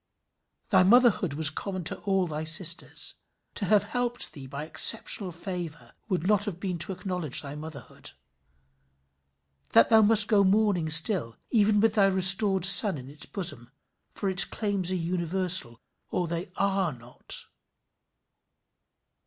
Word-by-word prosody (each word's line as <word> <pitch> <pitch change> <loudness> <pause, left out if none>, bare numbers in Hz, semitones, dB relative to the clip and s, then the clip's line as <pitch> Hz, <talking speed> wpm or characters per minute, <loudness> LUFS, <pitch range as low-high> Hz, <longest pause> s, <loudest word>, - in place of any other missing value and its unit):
Thy - - +3
motherhood 200 - +2
was 155 0 +4
common 185 +2 -7
to 165 - -4
all 195 -2 -2
thy 155 -2 -6
sisters. 170 +1 +1 0.4
To 205 - -3
have 205 +1 +2
helped 245 +3 -4
thee 135 -3 -11
by 140 +3 -8
exceptional 190 +3 +1
favour 170 - -9 0.2
would 180 -3 -3
not 205 0 0
have 190 -5 -7
been 180 -3 -5
to 165 +4 -4
acknowledge 180 -7 -4
thy 140 0 -9
motherhood. 155 0 -11 1.6
That 115 - +4
must 220 -1 +4
go 205 -3 +2
mourning 195 -4 0
still, 165 - +2
even 210 -2 +1
with 220 0 +1
thy 205 -3 +2
restored 190 0 +4
son 195 -2 +8
in 130 +1 -12
its 150 - -11
bosom, 145 - -4 0.5
for 200 - -5
its 190 -1 +6
claims 200 -4 -3
are - - -2
universal 175 -6 -1 0.3
or 180 - -3
they 170 +3 -6
are 195 -4 -2
not. 120 0 -8
185 Hz, 140 wpm, -25 LUFS, 160-200 Hz, 1.6 s, son